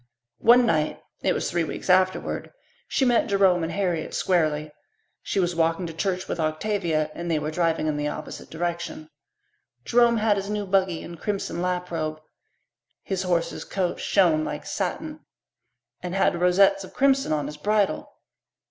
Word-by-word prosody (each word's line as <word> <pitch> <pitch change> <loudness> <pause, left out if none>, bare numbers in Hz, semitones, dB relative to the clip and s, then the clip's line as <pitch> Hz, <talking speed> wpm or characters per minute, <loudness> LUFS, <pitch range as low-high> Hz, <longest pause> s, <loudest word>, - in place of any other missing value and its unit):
One 240 +2 +6
night 155 -7 +1 0.2
it - - +2
was - - -2
three 170 -1 +1
weeks 160 - -6
afterward 185 0 +1 0.4
she 265 - +1
met 240 -2 +3
Jerome 195 -4 +3
and 165 +1 -2
Harriet 180 -5 -2
squarely. 155 -4 +1 0.5
She - - -2
was 175 -1 +1
walking 165 +2 +1
to 165 - -6
church 185 +2 -2
with - - -3
Octavia, 155 -1 0
and 170 0 -5
they 165 - +2
were 150 +1 -2
driving 165 -1 0
in 155 -1 0
the 150 0 -1
opposite - - -7
direction. 170 -1 -4 0.7
Jerome 235 -1 +4
had 215 -1 +2
his 200 +1 -4
new 210 -1 -2
buggy 190 -3 +1
and 170 -1 -9
crimson 195 -5 -3
lap 180 0 -2
robe. 155 -2 -3 0.8
His 190 -1 -2
horse's 175 -3 -1
coat 180 -3 -2
shone 170 -6 +3
like - - -5
satin 310 -1 -3 0.8
and 180 +1 -4
had 175 -3 +2
rosettes 195 +2 +4
of 185 - -12
crimson 270 - +3
on 150 -2 0
his 150 +1 -7
bridle. 205 +4 0
180 Hz, 165 wpm, -25 LUFS, 160-200 Hz, 0.8 s, One